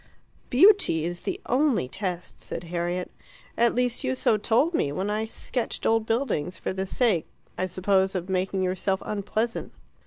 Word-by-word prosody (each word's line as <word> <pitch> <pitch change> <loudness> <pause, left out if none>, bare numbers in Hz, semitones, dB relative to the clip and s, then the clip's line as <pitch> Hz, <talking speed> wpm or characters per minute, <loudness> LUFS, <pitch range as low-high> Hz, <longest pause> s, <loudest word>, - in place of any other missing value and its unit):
"Beauty 300 - +5
is 175 0 -3
the 380 - -3
only 255 - +2
test," 180 +2 -5
said - - -6
Harriet. 175 +1 -3 0.4
"At 235 0 +3
least 245 -1 +1 0.2
so 130 - +3
you - - +3
told 240 - +2
me 145 - +1
when 190 +7 -2
I 215 +1 -1
sketched 240 +2 -4
old 225 0 +2
buildings 225 - -1
for - - -3
the 190 0 -3
sake, 210 -7 +1 0.3
I 185 - -1
suppose, 190 +1 +1
of 180 -1 -2
making 190 0 0
yourself 190 +1 -1
unpleasant." 215 +3 -2
195 Hz, 160 wpm, -26 LUFS, 180-235 Hz, 0.4 s, Beauty